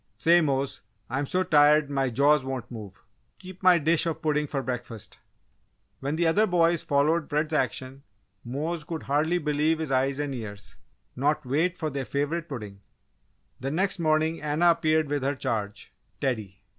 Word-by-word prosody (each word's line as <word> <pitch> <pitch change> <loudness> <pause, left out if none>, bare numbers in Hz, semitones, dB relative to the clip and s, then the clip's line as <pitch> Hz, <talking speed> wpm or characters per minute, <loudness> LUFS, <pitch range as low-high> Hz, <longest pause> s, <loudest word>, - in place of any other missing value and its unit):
"Say, 175 +1 +5
Mose, 140 -3 -1 0.3
I'm 135 +2 -1
so 185 +5 +1
tired 150 -2 +4
my 135 -2 +1
jaws 140 +4 +3
won't 130 -2 -5
move! 105 -5 -9 0.3
Keep 185 0 -12
my 185 -2 +6
dish 165 +2 +2
of 160 -1 -2
pudding 150 -1 +1
for 135 -1 -3
breakfast." 120 -4 -6 0.8
When 140 +3 -2
the 170 +1 +1
other 205 +7 +3
boys 170 -2 +2
followed 150 +3 +1
Fred's 150 +2 -1
action, 130 -1 -2 0.4
Mose 150 +6 -3
could 160 +1 -6
hardly 155 +5 +1
believe 150 0 +1
his 155 -3 -4
eyes 135 +1 +1
and 145 -1 -2
ears 105 -4 -8 0.4
not 150 +3 0
wait 165 +8 0
for 155 -2 -3
their 135 -1 -3
favourite 150 +5 -2
pudding! 105 -7 -7 0.8
The 135 - -3
next 185 +5 0
morning 155 0 +1
Anna 150 +4 +3
appeared 155 -1 +1
with 145 0 -1
her 140 +2 0
charge, 110 -6 -4 0.3
Teddy. 105 -8 -3
145 Hz, 165 wpm, -26 LUFS, 135-160 Hz, 0.8 s, my